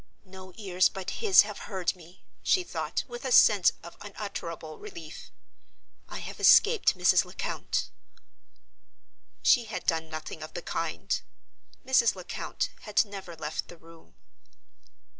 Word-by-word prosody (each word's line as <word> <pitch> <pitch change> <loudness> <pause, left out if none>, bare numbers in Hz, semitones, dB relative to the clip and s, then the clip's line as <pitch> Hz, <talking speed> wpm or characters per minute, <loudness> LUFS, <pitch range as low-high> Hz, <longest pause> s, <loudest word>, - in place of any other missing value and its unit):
"No 185 0 -12
ears 185 -4 +2
but 190 -1 -6
his 395 - +7
have 210 -1 -7
heard 190 -2 -1
me," 175 0 -17 0.2
she 370 - +2
thought, - - -3
with 240 -1 -8
a 260 - -3
sense 205 -6 +6
of 170 - -11
unutterable 170 -6 -7
relief. 160 -1 -10 0.8
"I - - -6
have - - -8
escaped 450 0 +5
Mrs. - - +4
Lecount." - - -3 1.5
She 240 - +5
had 215 - -6
done 160 -1 0
nothing 155 0 -7
of 155 - -9
the 175 - -5
kind. 165 -1 -2 0.6
Mrs. 245 -5 +4
Lecount 185 -1 -4
had 210 +1 +1
never 195 -4 -9
left 155 -1 -4
the 175 - -13
room. 165 0 -18
185 Hz, 135 wpm, -28 LUFS, 165-210 Hz, 1.5 s, his